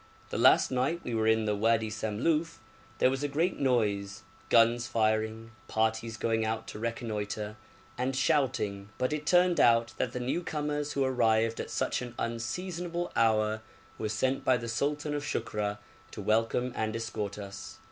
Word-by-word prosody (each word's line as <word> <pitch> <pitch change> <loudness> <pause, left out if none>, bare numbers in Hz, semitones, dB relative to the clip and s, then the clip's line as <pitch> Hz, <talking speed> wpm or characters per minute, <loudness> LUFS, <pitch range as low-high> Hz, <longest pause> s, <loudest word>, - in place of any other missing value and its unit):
The - - -2
last - - +5
night 135 +7 0
we 120 - -4
were 110 -1 +1
in 110 0 +3
the 105 -1 +1
Wadi 110 +1 +2
Samluf 125 +10 -1 0.4
there 130 - +4
was 135 +1 -2
a 145 - 0
great 160 +6 0
noise 100 -6 0 0.3
guns 120 +1 +4
firing, 110 0 0 0.2
parties 110 0 0
going 115 +1 0
out 110 0 -2
to - - -7
reconnoitre, 110 -2 -3 0.4
and 130 +1 0
shouting 130 -9 0
but 130 +3 0
it 150 -1 -4
turned 180 -2 +4
out 115 -2 +4
that 125 - -1
the 125 - -4
new 130 +8 -1
comers 150 -2 -2
who 140 - +1
arrived 115 -3 +2
at - - -4
such - - -1
an 120 -1 -7
unseasonable 170 +10 -3
hour 110 -1 +2 0.4
were 110 - -2
sent 130 +5 0
by 130 - +4
the 115 0 -6
sultan 145 +5 -1
of 145 -1 -2
Shukra 105 -7 -2 0.3
to - - -9
welcome 115 +3 +1
and 110 0 -1
escort 110 -3 -4
us. 100 +1 -8
115 Hz, 165 wpm, -30 LUFS, 110-135 Hz, 0.4 s, last